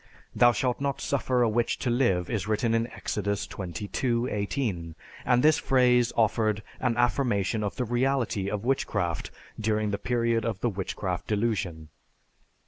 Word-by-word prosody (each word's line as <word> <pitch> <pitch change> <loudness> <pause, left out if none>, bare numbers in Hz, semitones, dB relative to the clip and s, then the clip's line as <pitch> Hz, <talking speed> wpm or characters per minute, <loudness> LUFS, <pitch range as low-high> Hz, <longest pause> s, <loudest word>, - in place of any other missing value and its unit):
"Thou 120 +2 +6
shalt 125 +3 -1
not 140 -1 -1
suffer 130 -3 +1
a - - +3
witch 115 +2 0
to 125 - -1
live," 95 -8 +2
is 105 -5 -2
written 110 +2 +1
in 115 0 +1
Exodus 100 -3 -3
XXII, 105 +7 -2
18, 100 - -2 0.3
and 125 0 +3
this 155 +2 +5
phrase 125 -5 +3
offered 110 -2 +2 0.2
an 120 -3 0
affirmation 120 -4 +1
of 100 - -3
the 125 - -1
reality 120 -4 0
of 105 +2 -3
witchcraft 135 +1 -1 0.3
during 110 -1 0
the 100 - -2
period 115 -2 0
of 115 -4 -2
the 120 - 0
Witchcraft 95 -2 -4
Delusion. 100 -8 -1
115 Hz, 150 wpm, -27 LUFS, 100-125 Hz, 0.3 s, Thou